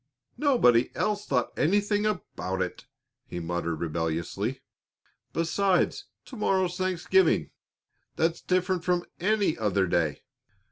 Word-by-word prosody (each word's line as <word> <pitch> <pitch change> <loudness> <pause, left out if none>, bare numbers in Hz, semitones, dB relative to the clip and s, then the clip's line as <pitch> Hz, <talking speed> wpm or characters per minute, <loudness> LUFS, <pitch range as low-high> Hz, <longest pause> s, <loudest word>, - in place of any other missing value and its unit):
"Nobody 185 - +4
else 210 -1 -1
thought 125 -3 0
anything 205 +5 +2
about 95 - -3
it!" 90 -1 -4 0.4
he 90 - -5
muttered 85 0 -2
rebelliously. 85 - -2 0.7
"Besides, 180 +3 +1 0.2
to 260 - -10
morrow's 190 -5 +1
Thanksgiving; 185 - +2 0.6
that's 165 +1 0
different 185 -1 0
from 180 -1 +1
any 205 -2 +2
other 100 -3 +2
day." 85 -4 0
170 Hz, 105 wpm, -27 LUFS, -, 0.7 s, Nobody